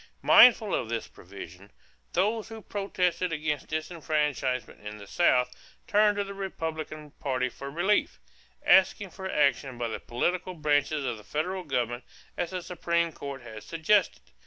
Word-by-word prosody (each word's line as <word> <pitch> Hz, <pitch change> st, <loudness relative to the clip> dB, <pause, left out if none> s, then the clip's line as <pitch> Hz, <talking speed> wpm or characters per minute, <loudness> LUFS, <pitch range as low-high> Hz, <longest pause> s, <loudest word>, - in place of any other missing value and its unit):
Mindful 225 Hz, -4 st, +7 dB
of 110 Hz, -, -1 dB
this 115 Hz, -1 st, -3 dB
provision, 95 Hz, +1 st, -12 dB, 0.4 s
those 210 Hz, +5 st, +1 dB
who 225 Hz, -1 st, -9 dB
protested 180 Hz, -3 st, -1 dB
against 150 Hz, -2 st, -2 dB
disfranchisement 150 Hz, -7 st, -2 dB
in 105 Hz, 0 st, -7 dB
the 100 Hz, -, -10 dB
South 125 Hz, -, +3 dB, 0.3 s
turned 210 Hz, 0 st, +3 dB
to 205 Hz, -, +1 dB
the 200 Hz, 0 st, -7 dB
Republican 160 Hz, -5 st, -5 dB
party 130 Hz, -3 st, -1 dB
for 140 Hz, +2 st, -8 dB
relief, 175 Hz, +8 st, +1 dB, 0.5 s
asking 190 Hz, 0 st, +4 dB
for 190 Hz, +1 st, -6 dB
action 140 Hz, -4 st, +1 dB
by 120 Hz, -1 st, -2 dB
the -, -, -4 dB
political 180 Hz, +9 st, -2 dB
branches 150 Hz, -2 st, +1 dB
of 120 Hz, -3 st, -2 dB
the 105 Hz, -, -13 dB
federal 180 Hz, -, -2 dB
government 120 Hz, -5 st, -2 dB, 0.3 s
as 175 Hz, -, -2 dB
the 185 Hz, -2 st, -4 dB
Supreme 170 Hz, -1 st, 0 dB
Court 140 Hz, -3 st, -7 dB
had 110 Hz, -2 st, -9 dB
suggested. 170 Hz, +5 st, +1 dB
155 Hz, 150 wpm, -28 LUFS, 130-185 Hz, 0.5 s, Mindful